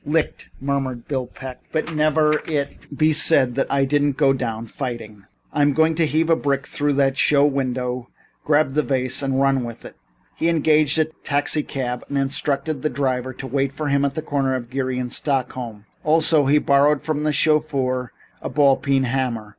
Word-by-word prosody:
"Licked," 155 +1 -2
murmured 135 -3 -3
Bill 130 -3 -2
Peck, 130 0 -10
"but 160 +1 -2
never 155 0 +2
let 150 - -3
it 145 -1 -4
be 155 0 +3
said 140 -5 +4
that 135 - -2
I 140 0 +2
didn't 145 0 +1
go 140 -2 +4
down 115 -4 -4
fighting. 115 -5 -7 0.3
I'm 145 -1 +2
going 160 +2 +3
to 160 0 +1
heave 160 +2 +1
a - - +6
brick 140 -3 -1
through 145 0 -1
that 135 -1 +1
show 145 0 +4
window, 125 -3 -2 0.3
grab 150 -2 +2
the 150 - +2
vase 130 -2 +1
and 135 -1 -1
run 135 -2 +2
with 115 -1 -8
it." - - -10 0.4
He 165 - 0
engaged 155 -2 +3
a 160 - +3
taxicab 145 -4 -1
and 140 - -2
instructed 140 +1 -1
the 155 - 0
driver 130 -1 -2
to 135 - -8
wait 135 +1 -1
for 150 +1 -4
him 140 0 +2
at 140 -1 -1
the 155 - -4
corner 135 -3 -1
of 120 -1 -6
Geary 130 -1 -2
and 125 -1 -3
Stockton 135 -4 -1 0.3
Streets. 105 - -30 0.2
Also, 155 -2 +3
he 145 +2 +4
borrowed 145 0 +3
from 155 -2 -2
the 150 0 +1
chauffeur 140 -5 0 0.3
a - - -4
ball 140 0 +3
peen 135 -2 +1
hammer. 120 -4 -2
140 Hz, 195 wpm, -21 LUFS, 130-150 Hz, 0.4 s, a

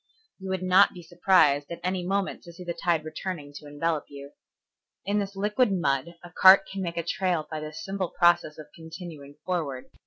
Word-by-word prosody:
You 190 0 -7
would 190 -1 -2
not 185 +2 +5
be 175 - -10
surprised 165 -4 +3
at 170 - -6
any 185 0 -1
moment 195 +2 -2
to 170 - -13
see 180 - -10
the 175 -1 -4
tide 165 -2 0
returning 155 -3 -6
to 150 - -12
envelop 150 +2 -2
you. 140 0 -11 0.7
In 205 +2 +1
this 200 0 -4
liquid 210 +4 +1
mud 170 -3 -1
a 175 - -11
cart 190 +2 +7
can 195 0 -6
make 170 -2 -4
a 170 - -1
trail 175 -2 -1
by 155 - -3
the 155 0 -6
simple 195 0 -4
process 175 -3 +2
of 155 - -9
continuing 160 -3 -10
forward. 155 -8 -3
175 Hz, 195 wpm, -26 LUFS, 155-190 Hz, 0.7 s, cart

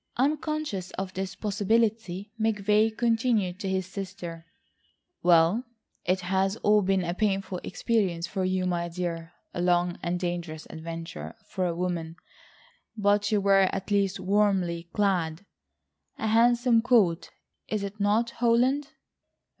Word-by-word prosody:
Unconscious 290 - -1
of 190 -1 -4
this 190 0 -4
possibility, 210 -2 0
McVay 215 0 +2
continued 225 -6 +1
to 195 - -3
his 190 -1 0
sister: 180 -4 -7 0.7
"Well, 175 +6 +4 0.4
it 185 +1 +1
has 190 +2 0
all 210 0 +5
been 190 -1 +1
a 170 0 -2
painful 195 -2 -1
experience 190 -8 0
for 190 +1 -3
you, 185 0 0
my 175 -1 -1
dear... 170 -1 -4 0.2
a 175 - -3
long 175 0 +1
and 175 +1 -1
dangerous 175 -3 -4
adventure 165 +5 -7
for 185 -3 -2
a 170 - -2
woman, 170 -2 -3 0.8
but 205 0 +2
you 210 - +3
were 195 -1 +4
at 195 +1 -5
least 195 -2 +1
warmly 185 -4 +1
clad. 185 -4 0 0.7
A - - -3
handsome 235 +1 +4
coat, 210 -9 +3 0.4
is 215 -2 -2
it 200 +1 -6
not, 215 +4 +2
Holland?" 245 +5 +2
195 Hz, 130 wpm, -27 LUFS, 175-215 Hz, 0.8 s, all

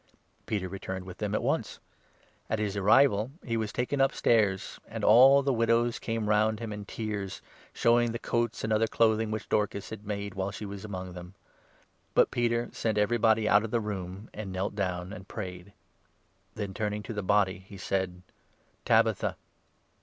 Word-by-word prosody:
Peter 100 -4 -1
returned 95 0 -6
with 90 -1 -10
them 105 -1 -1
at - - -1
once. - - -1 0.7
On 110 - 0
his 105 -2 -2
arrival, 105 +2 +4 0.2
39 - - -17
he 115 - +1
was 110 -2 -2
taken 135 +3 -1
upstairs, 110 -7 +2
and - - -6
all 135 +5 +7
the 135 0 +1
widows 115 0 +2
came 115 -2 -2
round 105 +1 +2
him 115 -2 -5
in 105 -1 -7
tears, 105 -3 -4 0.3
showing 120 0 +3
the 115 - -3
coats 120 -1 -1
and 110 0 0
other 110 +1 +3
clothing 110 -1 +2
which 110 0 -4
Dorcas 100 -2 -1
had 110 -2 -7
made 100 -1 -4
while 95 0 -2
she 105 +1 -7
was 100 -1 -7
among 95 -3 -6
them. 90 +1 -10 0.8
But - - +5
Peter 120 0 0
sent 110 -2 -1
everybody 110 +1 +3
40 110 - +1
out 105 +1 +5
of 115 - -4
the 120 - +1
room, 100 -1 -5
and 105 -3 -6
knelt 95 +2 -2
down 90 -2 -3
and 95 -2 -10
prayed. 90 -2 -7 0.8
Then, 100 -3 -4
turning 105 0 -2
to 115 - -6
the 105 - -2
body, 100 -1 +2
he 95 +1 -13
said: 95 -2 -2 0.6
"Tabitha! - - +2
105 Hz, 180 wpm, -29 LUFS, 95-115 Hz, 0.8 s, all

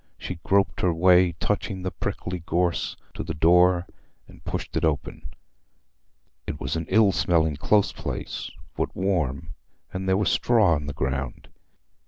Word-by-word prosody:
She 90 -2 -6
groped 100 0 +1
her 90 - +3
way, 90 +1 +4
touching 95 +2 -2
the 95 - -2
prickly 90 0 -4
gorse, 85 +1 0 0.2
to - - -5
the - - -5
door, 90 +3 +4 0.4
and - - -17
pushed - - -5
it - - 0
open. 80 -3 -2 1.2
It 70 - -4
was 65 +5 -3
an 80 -1 -3
ill 105 0 +5
smelling 80 -6 +1
close 105 +6 +2
place, - - -5 0.3
but - - -3
warm, 80 -5 -1 0.4
and 95 0 -3
there 95 - +3
was 105 - +1
straw 110 -8 +3
on 75 -2 -2
the 70 - -4
ground. 65 -1 -3
90 Hz, 155 wpm, -25 LUFS, 80-95 Hz, 1.2 s, ill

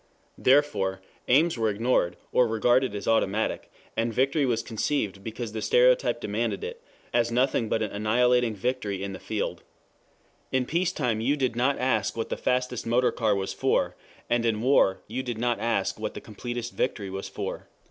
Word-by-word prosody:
Therefore, 130 -9 +3 0.3
aims 150 +2 +3
were 110 -1 +2
ignored, 105 -4 +1
or 125 - +4
regarded 120 +1 +2
as 100 - -5
automatic, 110 -1 0 0.2
and 115 +1 0
victory 135 +4 +2
was 115 -2 0
conceived, 110 -4 -2
because 115 +1 -5
the 110 0 -4
stereotype - - +3
demanded - - -2
it, 470 +1 -6 0.3
as 120 -1 +2
nothing 125 -2 +1
but 110 - +1
an 105 - -3
annihilating 120 +2 +2
victory 100 -3 -2
in 100 0 -4
the 95 - -7
field. 100 -5 -3 0.9
In 130 -1 +1
peace 170 +5 0
time 120 -10 -1
you 140 +6 +1
did 130 -4 0
not 130 +4 +2
ask 125 -4 0
what 115 - -2
the - - -1
fastest 125 -2 -1
motor 125 +2 +3
car 110 -3 +1
was 95 -1 -2
for, - - +1 0.3
and 120 0 +1
in 115 -1 0
war 125 -7 +4
you 120 +5 -3
did 120 -3 -4
not 120 +1 0
ask 115 0 0
what - - -4
the - - -4
completest 120 +2 -6
victory 100 -6 -2
was 95 0 -5
for. - - -5
120 Hz, 180 wpm, -27 LUFS, 110-130 Hz, 0.9 s, or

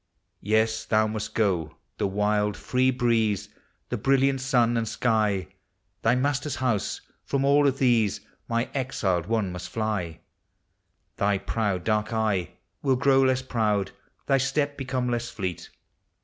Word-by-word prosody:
Yes, 110 +1 +1
thou 110 0 +3
must 110 0 -4
go! 90 -8 0 0.2
the - - +1
wild, 105 +1 0
free 130 +1 +1
breeze, 110 -5 +1 0.4
the 125 - -2
bril 135 +5 +3
liant 135 0 +2
sun 125 -3 +2
and 115 -1 0
sky, 105 -7 0 0.5
Thy 115 +2 +3
master's 140 +2 0
house, 120 -6 -1 0.2
from 140 -1 0
all 145 +1 +5
of 135 -1 +1
these 115 -6 +2 0.3
my 115 +1 0
exiled 95 -10 -1
one 110 -5 0
must 90 0 -7
fly; 105 -8 -3 1.0
Thy 100 0 +2
proud 100 -2 -2
dark 105 0 0
eye 105 -6 0 0.3
will 135 -2 +2
grow 135 +1 +4
less 130 -1 +2
proud, 105 -6 0 0.3
thy 135 -1 +3
Step 140 +2 0
become 130 -2 -2
less 120 -1 -1
fleet. 95 -5 -5
115 Hz, 145 wpm, -26 LUFS, 105-130 Hz, 1.0 s, all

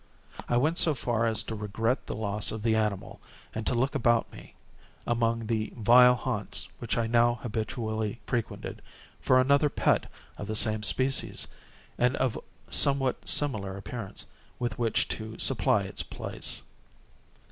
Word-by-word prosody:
I 120 - +2
went 155 +7 +1
so 155 -3 +4
far 115 -2 0
as 110 -2 +2
to - - -6
regret 110 +4 -2
the - - -4
loss 105 -1 0
of 110 -1 -6
the 115 -1 +2
animal, 105 -3 -2 0.3
and 110 0 -4
to - - +1
look 130 +4 +1
about 120 -2 +2
me, - - -13 0.5
among 115 -1 0
the 110 -1 -2
vile 125 +2 +6
haunts 115 - -3
which 120 - -2
I 115 - +1
now 120 +1 +3
habitually 110 -1 -3
frequented, 120 -3 -4 0.4
for 130 - +4
another 140 +3 +4
pet - - +1 0.3
of 100 - -5
the 110 - -3
same 110 0 +2
species, 130 +7 +1 0.5
and 125 +2 +3
of 130 -3 -1 0.3
somewhat 135 -2 +2
similar 100 -10 +1
appearance, 100 +1 -7 0.3
with 120 0 -3
which 115 0 +1
to 110 0 -5
supply - - +2
its - - -2
place. - - -3
115 Hz, 150 wpm, -28 LUFS, 110-125 Hz, 0.5 s, vile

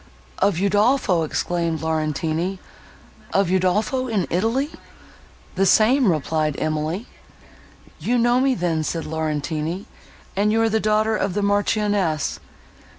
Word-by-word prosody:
"Of 195 -1 +2
Udolpho!" 205 0 +2
exclaimed 165 +1 -2
Laurentini, 160 +3 -1 0.8
"of 195 -2 +2
Udolpho 210 +8 +1
in 210 -7 0
Italy!" 230 - 0 0.8
"The 195 +1 +2
same," 230 +2 +4
replied 155 -1 -1
Emily. 155 +7 -2 0.9
"You 245 +1 0
know 240 +1 +3
me 265 0 +2
then," 165 -5 -1
said 165 +1 -3
Laurentini, 155 +3 -3 0.5
"and 205 +2 +2
you 225 - +2
are 225 - +2
the 220 0 +1
daughter 215 +1 +1
of 200 -3 -1
the 205 - 0
Marchioness." 205 -5 0
190 Hz, 120 wpm, -22 LUFS, 160-215 Hz, 0.9 s, same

